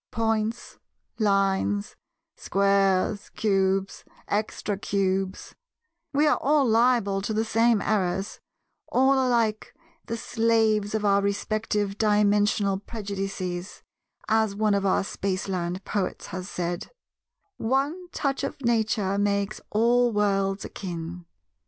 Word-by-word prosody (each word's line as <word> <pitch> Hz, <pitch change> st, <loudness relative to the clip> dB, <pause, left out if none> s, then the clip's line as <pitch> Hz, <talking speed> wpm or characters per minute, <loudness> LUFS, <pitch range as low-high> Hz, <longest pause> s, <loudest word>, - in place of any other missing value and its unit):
Points, 225 Hz, 0 st, -2 dB, 0.4 s
Lines, 200 Hz, 0 st, +1 dB, 0.4 s
Squares, 195 Hz, 0 st, +1 dB
Cubes, 195 Hz, -2 st, 0 dB, 0.2 s
Extra 210 Hz, 0 st, -2 dB
Cubes—we 205 Hz, -, -3 dB
are 300 Hz, -, +3 dB
all 290 Hz, 0 st, +3 dB
liable 225 Hz, -4 st, +3 dB
to 215 Hz, +2 st, -3 dB
the 220 Hz, +1 st, +1 dB
same 225 Hz, -1 st, +2 dB
errors, 195 Hz, -1 st, -1 dB, 0.5 s
all 265 Hz, +2 st, +3 dB
alike 235 Hz, -5 st, +1 dB, 0.3 s
the 230 Hz, -, -3 dB
Slaves 220 Hz, -2 st, +1 dB
of 215 Hz, -1 st, -1 dB
our 200 Hz, 0 st, +4 dB
respective 205 Hz, 0 st, -1 dB
Dimensional 205 Hz, -2 st, +2 dB
prejudices, 195 Hz, -3 st, -5 dB, 0.4 s
as 220 Hz, -2 st, +2 dB
one 210 Hz, 0 st, +2 dB
of 200 Hz, 0 st, +1 dB
our 190 Hz, -, +2 dB
Spaceland 185 Hz, -2 st, -3 dB
poets 200 Hz, -3 st, -2 dB
has 185 Hz, +1 st, -5 dB
said— 175 Hz, 0 st, -3 dB, 0.7 s
'One 285 Hz, +9 st, -1 dB
touch 275 Hz, -4 st, -2 dB
of -, -, -4 dB
Nature 220 Hz, -5 st, +1 dB
makes 200 Hz, 0 st, 0 dB
all 240 Hz, +3 st, +3 dB
worlds 195 Hz, -2 st, 0 dB
akin. 175 Hz, -2 st, -6 dB
205 Hz, 105 wpm, -26 LUFS, 195-225 Hz, 0.7 s, our